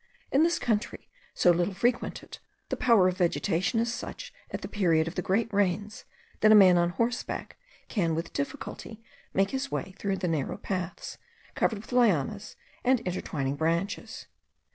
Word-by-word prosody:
In 275 Hz, -, +4 dB
this 340 Hz, +1 st, +3 dB
country, 220 Hz, -2 st, -2 dB, 0.2 s
so 175 Hz, -, +5 dB
little 175 Hz, +3 st, 0 dB
frequented, 240 Hz, +4 st, -2 dB, 0.3 s
the -, -, -1 dB
power 230 Hz, -7 st, +4 dB
of 185 Hz, +1 st, -2 dB
vegetation 175 Hz, +5 st, +1 dB
is 230 Hz, +1 st, 0 dB
such -, -, -7 dB, 0.2 s
at -, -, -5 dB
the -, -, -3 dB
period 165 Hz, -6 st, +2 dB
of 165 Hz, -, -4 dB
the 180 Hz, -, -2 dB
great 215 Hz, +5 st, 0 dB
rains, 205 Hz, +1 st, 0 dB, 0.3 s
that 215 Hz, -, +5 dB
a -, -, +9 dB
man 190 Hz, -3 st, +8 dB
on 175 Hz, 0 st, +3 dB
horseback 235 Hz, +6 st, -2 dB, 0.3 s
can 170 Hz, -7 st, 0 dB
with 165 Hz, +1 st, -4 dB
difficulty 270 Hz, -5 st, -5 dB, 0.3 s
make 195 Hz, +1 st, +1 dB
his 270 Hz, +1 st, -2 dB
way 190 Hz, -6 st, -4 dB
through 195 Hz, -1 st, -1 dB
narrow 165 Hz, -7 st, -2 dB
paths, 185 Hz, -2 st, -5 dB, 0.3 s
covered 220 Hz, -, +1 dB
with 210 Hz, -, -11 dB
lianas 210 Hz, -, +1 dB, 0.3 s
and 255 Hz, 0 st, +3 dB
intertwining 145 Hz, -, -3 dB
branches. 170 Hz, +6 st, -2 dB
195 Hz, 160 wpm, -28 LUFS, 175-230 Hz, 0.3 s, a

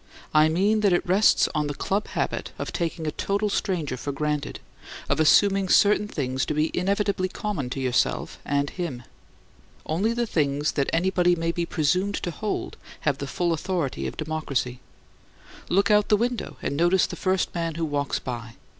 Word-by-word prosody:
I 155 Hz, +1 st, +6 dB
mean 200 Hz, +7 st, +2 dB
that 205 Hz, -3 st, +3 dB
it 175 Hz, -, +1 dB
rests 195 Hz, +5 st, +4 dB
on 150 Hz, -1 st, 0 dB
that 145 Hz, -, -5 dB
club 200 Hz, +2 st, -1 dB
habit -, -, -3 dB
of -, -, -5 dB
taking 165 Hz, -2 st, -2 dB
a 155 Hz, -, -1 dB
total 200 Hz, +6 st, -1 dB
stranger 165 Hz, -10 st, -1 dB
for 140 Hz, -, -4 dB
granted, 150 Hz, +1 st, -2 dB, 0.5 s
of -, -, 0 dB
assuming 195 Hz, +4 st, +4 dB
certain 210 Hz, +2 st, +4 dB
things 130 Hz, -8 st, -2 dB
to 150 Hz, -, -1 dB
be 155 Hz, +1 st, 0 dB
inevitably 200 Hz, 0 st, 0 dB
common 180 Hz, -11 st, -3 dB
to 135 Hz, -, -4 dB
yourself 130 Hz, -2 st, 0 dB
and 140 Hz, 0 st, 0 dB
him. 150 Hz, -10 st, -5 dB, 0.8 s
Only 195 Hz, +9 st, 0 dB
the 240 Hz, 0 st, 0 dB
things 145 Hz, -6 st, 0 dB
that 140 Hz, -2 st, 0 dB
anybody 180 Hz, +1 st, +2 dB
may 165 Hz, 0 st, -1 dB
be 170 Hz, 0 st, -2 dB
presumed 180 Hz, +8 st, +1 dB
to 175 Hz, -, -3 dB
hold 205 Hz, +6 st, -4 dB, 0.2 s
have 145 Hz, -3 st, 0 dB
the 140 Hz, -, -4 dB
full 175 Hz, +2 st, 0 dB
authority 170 Hz, -4 st, -2 dB
of -, -, -7 dB
democracy. 150 Hz, -6 st, -2 dB, 0.9 s
Look 200 Hz, +3 st, +3 dB
out 210 Hz, 0 st, +5 dB
of -, -, -21 dB
the 210 Hz, -, +5 dB
window 240 Hz, +1 st, -2 dB
and -, -, -1 dB
notice 175 Hz, +4 st, +3 dB
the -, -, -6 dB
first 185 Hz, -1 st, 0 dB
man 165 Hz, -2 st, -2 dB
who 165 Hz, 0 st, -1 dB
walks 145 Hz, -2 st, -1 dB
by. 120 Hz, -2 st, -6 dB
170 Hz, 180 wpm, -25 LUFS, 145-195 Hz, 0.9 s, I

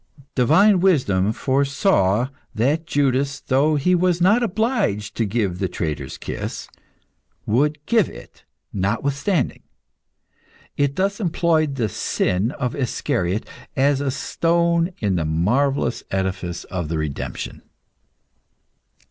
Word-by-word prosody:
Divine 180 Hz, -, +5 dB
wisdom 115 Hz, -, +2 dB
foresaw 130 Hz, -, +1 dB, 0.3 s
that 145 Hz, +9 st, +1 dB
Judas, 140 Hz, -2 st, +1 dB
though 145 Hz, +4 st, +2 dB
he 165 Hz, +6 st, +2 dB
was 180 Hz, -1 st, +2 dB
not 205 Hz, +7 st, +4 dB
obliged 215 Hz, -, 0 dB
to 115 Hz, -, +1 dB
give 100 Hz, -4 st, -1 dB
the 95 Hz, -, 0 dB
traitor's 80 Hz, -4 st, -4 dB
kiss, -, -, -5 dB, 0.8 s
would 145 Hz, +7 st, +2 dB
give 225 Hz, -7 st, +3 dB
it, -, -, -13 dB, 0.3 s
notwithstanding. 135 Hz, -, -1 dB, 1.1 s
It 145 Hz, -1 st, 0 dB
thus 195 Hz, +1 st, 0 dB
employed 165 Hz, -6 st, +1 dB
the 120 Hz, -5 st, 0 dB
sin 95 Hz, +1 st, 0 dB
of 125 Hz, -3 st, -3 dB
Iscariot 105 Hz, -6 st, -1 dB, 0.3 s
as 140 Hz, +1 st, +2 dB
a 140 Hz, -, 0 dB
stone 170 Hz, +4 st, +1 dB
in 100 Hz, -4 st, 0 dB
the 80 Hz, -, -1 dB
marvellous 120 Hz, -, +1 dB
edifice 95 Hz, -2 st, -2 dB
of 85 Hz, -5 st, -4 dB
the 80 Hz, -, -1 dB
redemption. 70 Hz, -5 st, -4 dB
135 Hz, 115 wpm, -22 LUFS, -, 1.1 s, Divine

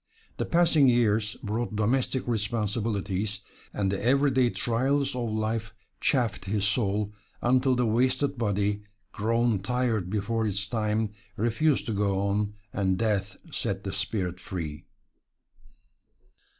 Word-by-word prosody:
The -, -, -2 dB
passing 165 Hz, -5 st, +5 dB
years 110 Hz, -3 st, +2 dB
brought 110 Hz, +1 st, -2 dB
domestic 125 Hz, +4 st, +1 dB
responsibilities, 105 Hz, -2 st, -1 dB, 0.3 s
and 95 Hz, -2 st, 0 dB
the 100 Hz, -, -2 dB
every 135 Hz, +4 st, +4 dB
day 125 Hz, -1 st, +3 dB
trials 135 Hz, +4 st, +1 dB
of 120 Hz, -2 st, -2 dB
life 110 Hz, 0 st, -2 dB, 0.2 s
chafed 115 Hz, -8 st, +1 dB
his 100 Hz, 0 st, 0 dB
soul, 105 Hz, -1 st, +1 dB, 0.3 s
until 130 Hz, +1 st, +3 dB
the 125 Hz, 0 st, +2 dB
wasted 130 Hz, +5 st, +2 dB
body, 105 Hz, -3 st, 0 dB, 0.3 s
grown 115 Hz, 0 st, +1 dB
tired 115 Hz, -3 st, 0 dB
before 110 Hz, +2 st, 0 dB
its 100 Hz, 0 st, -1 dB
time, 105 Hz, -1 st, 0 dB, 0.3 s
refused 120 Hz, +7 st, +2 dB
to 115 Hz, -, -2 dB
go 100 Hz, -1 st, +1 dB
on, 100 Hz, +1 st, 0 dB, 0.2 s
and 95 Hz, -2 st, +1 dB
death 100 Hz, -2 st, 0 dB
set 95 Hz, 0 st, -2 dB
the 95 Hz, 0 st, -4 dB
spirit 95 Hz, -2 st, -2 dB
free. 80 Hz, -5 st, -5 dB
110 Hz, 125 wpm, -27 LUFS, 100-120 Hz, 0.3 s, passing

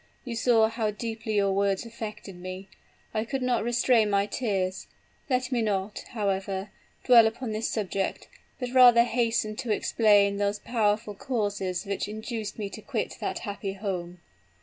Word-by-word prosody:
You 240 Hz, -2 st, -4 dB
saw 225 Hz, -1 st, +4 dB
how 225 Hz, -1 st, -1 dB
deeply 220 Hz, 0 st, -4 dB
your 200 Hz, -1 st, +2 dB
words 195 Hz, +1 st, +1 dB
affected 215 Hz, -4 st, -7 dB
me 185 Hz, +2 st, -8 dB, 0.4 s
I 215 Hz, -1 st, 0 dB
could 265 Hz, +3 st, -3 dB
not 245 Hz, -3 st, +1 dB
restrain 235 Hz, -2 st, +3 dB
my 200 Hz, 0 st, +2 dB
tears. 190 Hz, -5 st, -2 dB, 0.4 s
Let 255 Hz, 0 st, 0 dB
me 245 Hz, -2 st, +1 dB
not, 205 Hz, -1 st, -1 dB
however, 195 Hz, -2 st, -2 dB, 0.3 s
dwell 235 Hz, -3 st, +7 dB
upon 225 Hz, +1 st, -4 dB
this 215 Hz, +1 st, -1 dB
subject; 195 Hz, -2 st, -2 dB, 0.3 s
but 250 Hz, -1 st, -4 dB
rather 245 Hz, -2 st, +8 dB
hasten 230 Hz, -3 st, 0 dB
to 250 Hz, -2 st, -5 dB
explain 205 Hz, -2 st, +3 dB
those 205 Hz, 0 st, 0 dB
powerful 215 Hz, -1 st, 0 dB
causes 200 Hz, -5 st, -2 dB
which 200 Hz, 0 st, -2 dB
induced 220 Hz, 0 st, -5 dB
me 210 Hz, -2 st, -3 dB
to -, -, -8 dB
quit -, -, -3 dB
that -, -, -2 dB
happy 200 Hz, -1 st, -4 dB
home. 180 Hz, -3 st, -5 dB
215 Hz, 155 wpm, -27 LUFS, 200-235 Hz, 0.4 s, rather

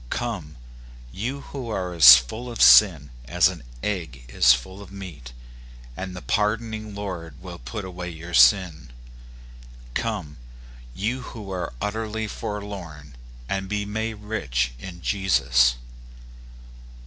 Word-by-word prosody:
Come, 90 Hz, -, -4 dB, 0.5 s
you 125 Hz, -, -4 dB
who 135 Hz, -4 st, -7 dB
are 90 Hz, -4 st, -3 dB
as 70 Hz, -6 st, +11 dB
full 110 Hz, -, -6 dB
of 120 Hz, -, -7 dB
sin 80 Hz, -, +7 dB
as 90 Hz, +7 st, +3 dB
an 90 Hz, -4 st, -8 dB, 0.2 s
egg 80 Hz, -12 st, -4 dB
is -, -, +5 dB
full 95 Hz, +1 st, -1 dB
of 100 Hz, -, -12 dB
meat, 85 Hz, -11 st, -9 dB, 0.6 s
and 95 Hz, +3 st, -6 dB
the 90 Hz, -, -8 dB
pardoning 110 Hz, 0 st, -1 dB
Lord 85 Hz, -8 st, -6 dB
will -, -, -9 dB
put 95 Hz, -, -6 dB
away 90 Hz, -1 st, -6 dB
your 85 Hz, +1 st, -9 dB
sin. 80 Hz, +1 st, +4 dB, 1.0 s
Come, 100 Hz, -, -3 dB, 0.6 s
you 115 Hz, +7 st, -2 dB
who 105 Hz, -5 st, -9 dB
are 90 Hz, -7 st, -4 dB
utterly 110 Hz, +1 st, -3 dB
forlorn, 95 Hz, -11 st, -7 dB, 0.3 s
and 95 Hz, +3 st, -3 dB
be 105 Hz, 0 st, -2 dB
made 110 Hz, +2 st, -3 dB
rich 65 Hz, -, -2 dB
in 85 Hz, +4 st, -10 dB
Jesus. 60 Hz, -11 st, +3 dB
95 Hz, 125 wpm, -24 LUFS, 80-105 Hz, 1.0 s, as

